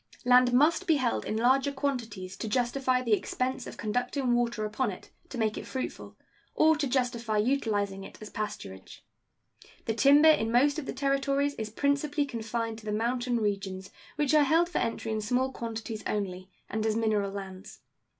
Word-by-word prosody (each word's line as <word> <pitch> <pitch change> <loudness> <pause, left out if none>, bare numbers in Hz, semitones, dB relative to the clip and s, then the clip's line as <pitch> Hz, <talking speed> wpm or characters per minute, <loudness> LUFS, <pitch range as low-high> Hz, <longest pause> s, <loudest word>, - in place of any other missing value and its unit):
Land 250 0 +6
must 310 +9 +3
be 325 - +5
held 255 -4 0
in 215 - -2
larger 265 +4 +3
quantities 230 -10 -3
to 225 - -4
justify 255 +2 +1
the 230 -3 +1
expense 255 +4 -1
of - - -9
conducting 245 +3 -1
water 235 -2 0
upon 210 +3 -1
it 185 - -9 0.2
to 255 - -7
make 220 -2 0
it - - -9
fruitful, 260 - -6 0.4
or 315 0 +5
to 290 -2 0
justify 240 -4 0
utilizing 210 -5 0
it - - -12
as 215 - -10
pasturage. 95 - -6 0.8
The 225 - 0
timber 285 +6 +6
in 225 -7 +1
most 280 +5 +3
of 285 - -7
the - - -3
Territories 275 0 0
is 220 -5 -5
principally 285 +4 0
confined 230 -2 -4
to 215 - -15
the 210 - -2
mountain 240 +3 0
regions, 195 -3 -3 0.2
which 295 0 +1
are 305 - +6
held 330 +5 +3
for - - -1
entry 230 -1 -2
in 215 0 -1
small 250 +5 0
quantities 225 -2 -5
only, 185 -3 -3 0.2
and 220 +1 -2
as 220 -1 +1
mineral 215 -3 +1
lands. 195 0 -8
240 Hz, 180 wpm, -29 LUFS, 215-275 Hz, 0.8 s, Land